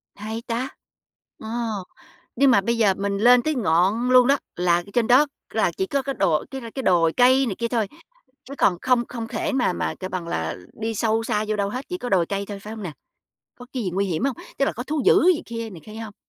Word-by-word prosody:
Hay 220 +2 -5
ta! 245 +3 -2 0.7
Ồ, 220 - -9 0.9
nhưng 275 +2 +5
mà 200 - +5
bây 235 +4 0
giờ 210 -4 +4
mình 200 +1 -2
lên 245 +4 +6
tới 310 -1 0
ngọn 200 +3 +2
luôn 250 -1 +7
đó, 280 +1 +4 0.2
là 175 -1 +2
ở 175 - -3
trên 235 -2 +2
đó 260 +5 +6 0.3
là - - +2
chỉ 380 - 0
có 280 -5 0
cái 275 0 -4
đồ 155 -2 +1
cái 270 - -5
cái 265 - -3
đồi 165 -5 +3
cây 260 +2 +5
này 215 -6 -3
kia 235 - -2
thôi, 230 -3 0 0.6
chứ 275 - -10
còn 180 -8 +3
không 250 -2 +2
không 230 -2 -6
thể 290 - -2
mà 245 -8 +1
mà, - - -2
kêu 185 - -5
bằng 180 -2 -4
là, 80 - -2 0.2
đi 225 0 -2
sâu 225 +1 +1
xa 215 -1 -1
vô 215 - 0
đâu 200 -1 -1
hết, 255 +6 -5
chỉ 360 - -3
có 250 - -5
đồi 185 -4 +3
cây 200 +2 -3
thôi, 205 -1 -6
phải 210 +2 -8
hông 220 -2 -7
nè? 180 - -4 0.7
Có 245 - -11
cái 255 -3 -2
gì 190 - -1
nguy 195 +2 +1
hiểm 180 +2 -2
hông? 270 -3 0 0.2
Tức 275 - +2
là - - 0
có 245 - -5
thú 300 +2 -2
dữ - - +6
gì - - -6
kia, 230 -1 -5
này 175 -6 -11
kia 215 - -10
hông? 220 -2 -7
225 Hz, 255 wpm, -23 LUFS, 195-250 Hz, 0.9 s, luôn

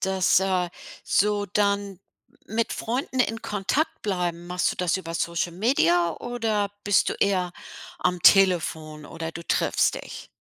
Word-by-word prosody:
Dass, 190 -1 +2
äh 185 -2 0 0.4
so 205 0 +1
dann 200 -1 0 0.5
mit 225 +2 -1
Freunden 255 +3 -3
in 225 -2 0
Kontakt 210 +11 -1
bleiben, 175 -4 -2
machst 180 0 0
du - - -6
das 180 -1 0
über 165 -3 -6
Social-Media 170 - +1
oder 225 -4 -1
bist 205 -1 +3
du - - -2
eher 185 -3 0 0.5
am 180 -1 -1
Telefon 160 -5 +3
oder 165 0 -6
du 170 - -7
triffst - - +1
dich? - - -9
190 Hz, 140 wpm, -25 LUFS, 175-205 Hz, 0.5 s, bist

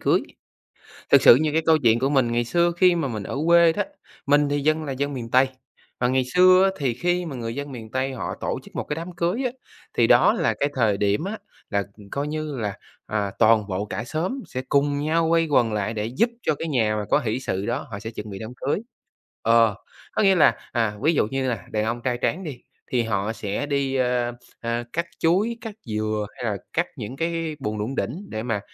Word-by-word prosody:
cưới. - - +3 0.9
Thực - - +7
sự - - +9
như 155 +2 +1
cái 160 - +3
câu 160 -1 +5
chuyện 115 0 +5
của 135 +2 +1
mình 130 -5 +2
ngày 120 0 +1
xưa 170 +8 +2
khi 180 -1 +5
mà 165 -5 0
mình 110 -5 -4
ở 135 - -4
quê 170 -1 +6
đó, 205 - 0 0.4
mình 145 +1 +3
thì 145 0 0
dân 155 +2 +1
là 145 - -4
dân 140 +2 -2
miền 120 -3 -6
Tây, 130 +1 +5 0.5
mà 125 - +2
ngày 130 +1 +2
xưa 185 +1 +7
á, 195 - +4
thì 135 -4 0
khi 175 +7 0
mà 145 -5 -5
người 115 -1 -4
dân 140 0 -5
miền 110 -3 -9
Tây 130 +1 -1
họ 125 - -4
tổ - - -2
chức - - -16
1 - - -2
cái 150 - -4
đám 165 +3 -6
cưới 175 +9 -1
á, 250 - 0 0.5
thì - - +5
đó - - +6
là - - +1
cái 140 - +2
thời 110 -6 +2
điểm 100 +7 +1
á, 205 +4 -4 0.3
là 100 -2 0 0.3
coi 140 +1 -2
như 155 -1 -3
là, 105 -4 -2 0.3
à, 105 -2 -2
toàn 110 -2 +5
bộ 95 +2 -2
cả 105 +2 -4
xóm 165 - -2
sẽ 130 - -4
cùng 145 0 +2
nhau 160 +3 +1
quay 165 0 +3
quần 120 -7 +2
lại 105 +1 -1
để 105 -1 -2
giúp 130 - +1
cho 155 - +1
cái 165 - -4
nhà 115 -8 +1
mà 105 -1 -2
có - - +4
hỉ 115 +1 -2
sự 95 -6 -3
đó 120 +6 -2
họ 100 - -5
sẽ 110 - -6
chuẩn 105 -1 -7
bị 95 -1 -7
đám 110 - -6
cưới. 140 +8 -1 0.6
Ờ, 115 -2 +4 0.4
có - - +1
nghĩa 195 -1 +5
là, 175 - +5
à, 115 -3 0
ví 160 +4 +3
dụ 140 - +2
như 135 -1 0
là 105 -7 -4
đàn 105 0 0
ông 115 +2 -2
trai 125 -1 0
tráng 185 +7 0
đi, 140 -8 -7 0.3
thì 125 -2 +2
họ 110 -1 -1
sẽ 105 +4 -3
đi, 140 -2 -1
ơ, 125 -2 +1 0.3
ơ, 115 0 -2
cắt 170 +1 0
chuối, 200 +8 +2
cắt 225 -2 -6
dừa 110 -1 -1
hay 120 - -6
là 105 -3 -1 0.2
cắt 170 +2 +1
những 120 0 -6
cái 165 0 -2
buồng 105 -4 -3
đủng 115 +6 -3
đỉnh 175 - -3
để 110 - -4
mà 115 -4 -1
130 Hz, 240 wpm, -24 LUFS, 110-160 Hz, 0.9 s, sự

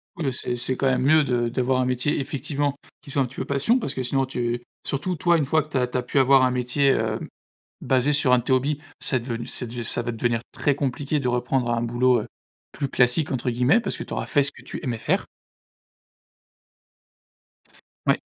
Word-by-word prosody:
Oui, 170 -5 -4
heu, 135 - +1
c'est 125 -1 -3
c'est 125 +1 -2
quand 135 - +1
même 130 -1 +1
mieux 155 +2 +5
de 120 -3 0
d'avoir 130 +1 0
un 125 - +2
métier, 125 +4 0
effectivement, 140 +1 -2 0.3
qui 145 -2 -10
soit 140 - +1
un - - +2
petit 125 +2 -11
peu - - -3
passion, 140 - +2
parce 140 - -3
que 130 - -3
sinon 135 +2 0
tu 120 -2 -2 0.2
surtout 165 +6 -2
toi, 170 +2 +3
une 150 - +1
fois 155 +3 +2
que 155 - -18
tu 145 - -1
as 125 - +2
tu 125 - -3
as 125 - -1
pu 125 - -3
avoir 135 0 +6
un 130 - +3
métier, 125 +3 +1
hem, 135 - +1 0.5
basé 130 +3 +2
sur 140 -3 +3
1 125 - +6
de - - -2
tes 130 - 0
hobbies, 140 +3 +1 0.2
c'est 130 -3 0
devenu 115 -1 -5
c'est 125 - -2
dev 120 +1 -5
ça 120 +1 -1
va 120 0 -3
devenir 115 0 0
très 145 - +1
compliqué 140 +2 -1
de 125 - -1
reprendre 125 0 0
un 115 0 0
boulot, 120 0 +2
heu, - - -8 0.5
«plus 140 -2 -3
classique» 125 +5 +2
entre 125 -1 -2
guillemets, 125 - +3
parce - - -3
que - - -6
tu - - -10
auras - - -2
fait 145 - +3
ce 145 +1 -1
que - - -15
tu - - -7
aimais 120 -3 -2
faire. 185 - 0 2.8
Oui. - - +4
130 Hz, 235 wpm, -24 LUFS, 125-140 Hz, 2.8 s, avoir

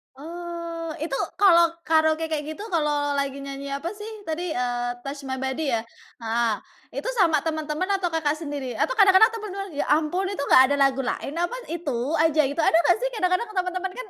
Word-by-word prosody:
Oh 335 +1 -6
itu 310 -3 -2 0.2
kalau 340 -4 +6 0.2
karaoke 315 0 +3
kayak 310 -2 -2
gitu 410 +7 -7
kalau 295 -4 0
lagi 280 0 -2
nyanyi 275 0 -6
apa 330 +8 -4
sih 420 +1 -8 0.2
tadi, 325 +1 -2
eee, 245 -1 -1
Touch 275 +3 -7
My 265 -1 -4
Body 265 +2 -2
ya? 230 - +1 0.4
Heeh 230 0 0 0.5
itu - - -6
sama 335 -8 +4
teman-teman 310 +3 -2
atau 360 -3 -1
Kakak 310 -2 0
sendiri 285 -5 -5
atau - - 0
kadang-kadang 405 0 +6
temen-temen, 400 -3 -6
"Ya - - 0
ampun 315 +5 +1
itu 385 -7 -3
enggak 260 - +7
ada 285 - +1
lagu 275 -1 +2
lain 265 +1 -3
apa 350 +8 -1 0.2
itu 325 -6 -3 0.2
aja," 315 -1 +4
gitu. 285 +3 -2
Ada 320 - +3
enggak 345 +2 +4
sih - - -1
kadang-kadang 365 +3 +1
teman-teman 370 0 -2
kan - - -7
315 Hz, 185 wpm, -24 LUFS, 280-360 Hz, 0.5 s, enggak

